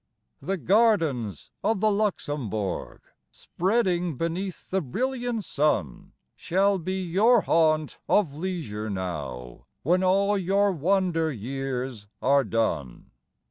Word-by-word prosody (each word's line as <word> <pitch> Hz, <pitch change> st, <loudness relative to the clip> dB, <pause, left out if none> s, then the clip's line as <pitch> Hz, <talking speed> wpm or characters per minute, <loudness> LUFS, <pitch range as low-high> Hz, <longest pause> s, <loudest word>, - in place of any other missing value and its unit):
The 195 Hz, +1 st, -2 dB
gardens 165 Hz, -, +1 dB
of 220 Hz, -2 st, +1 dB
the 215 Hz, +1 st, +3 dB
Luxembourg, 145 Hz, -, -2 dB, 0.3 s
Spreading 180 Hz, -, 0 dB
beneath 175 Hz, +4 st, -4 dB
the 190 Hz, 0 st, +1 dB
brilliant 240 Hz, -, -2 dB
sun, 140 Hz, -, -1 dB, 0.2 s
Shall 195 Hz, +2 st, +1 dB
be 185 Hz, +2 st, -3 dB
your 210 Hz, +7 st, +4 dB
haunt 155 Hz, -3 st, +2 dB
of 180 Hz, -9 st, +3 dB
leisure 150 Hz, -, -4 dB
now 75 Hz, -11 st, -5 dB, 0.2 s
When 180 Hz, +5 st, +2 dB
all 200 Hz, +2 st, +3 dB
your 195 Hz, +2 st, +2 dB
wander 175 Hz, -1 st, +1 dB
years 130 Hz, -2 st, -4 dB
are 140 Hz, +1 st, +3 dB
done. 95 Hz, -, -2 dB
165 Hz, 105 wpm, -26 LUFS, 125-195 Hz, 0.3 s, your